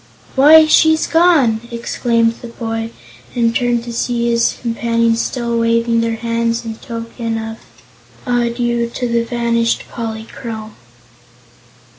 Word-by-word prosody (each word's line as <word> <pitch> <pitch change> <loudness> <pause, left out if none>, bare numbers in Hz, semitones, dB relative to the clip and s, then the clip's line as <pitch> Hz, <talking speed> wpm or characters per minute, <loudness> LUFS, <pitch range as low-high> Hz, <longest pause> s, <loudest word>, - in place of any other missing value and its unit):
"Why, 310 +4 +8
she's 315 0 +4
gone!" 320 -10 +3
exclaimed 230 -1 0
the 240 - -7
boy, 225 -1 -4 0.5
and 230 -1 +1
turned 240 -1 +1
to 235 0 -7
see 235 0 0
his 235 0 +1
companions 230 -1 0
still 235 -2 -2
waving 230 0 +2
their 230 0 -1
hands 230 +1 -1
in 225 -1 -5
token 230 0 -5
of 225 0 -6 0.7
adieu 240 -1 0
to 245 +1 -3
the 235 0 +1
vanished 235 -1 0
Polychrome. 220 -1 -6
235 Hz, 120 wpm, -17 LUFS, 230-240 Hz, 0.7 s, Why